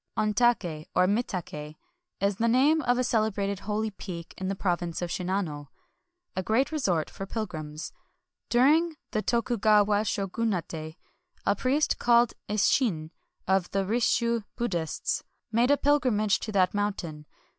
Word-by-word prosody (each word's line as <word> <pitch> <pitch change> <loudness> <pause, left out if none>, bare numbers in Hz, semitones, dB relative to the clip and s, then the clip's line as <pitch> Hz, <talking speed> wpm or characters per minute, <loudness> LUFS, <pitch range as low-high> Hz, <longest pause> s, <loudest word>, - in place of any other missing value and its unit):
Ontake, 210 -8 +1
or 180 - +5
Mitak^, 180 -8 -2 0.4
is 200 -1 +1
the 230 - +1
name 280 +7 +4
of 245 -2 +2
a 255 - +2
celebrated 210 -4 0
holy 215 +2 -2
peak 175 -4 -8
in 190 - -4
the 195 - -1
province 175 -3 -1
of 175 -1 -3
Shinano 180 -6 -2 0.3
— 355 0 -52
a 185 - 0
great 225 - +1
resort 185 - 0
for 195 - -7
pilgrims. 155 -8 -5 0.6
During 310 +7 +4 0.2
the 215 - 0
Tokugawa 215 -3 +3
Shogunate, 185 -7 -2 0.5
a 200 - +3
priest 275 +8 +1
called 240 -1 +4 0.2
Isshin, 205 - +1 0.4
of 190 -1 +2
the 195 0 0
Risshu 235 +1 +1
Buddhists, 175 -10 -2 0.3
made 235 +3 +3
a 285 - +5
pilgrimage 245 -9 +2
to 220 - -5
that 190 -3 +2
moun 205 0 +1
tain. 155 -5 -8
205 Hz, 140 wpm, -28 LUFS, 180-235 Hz, 0.6 s, or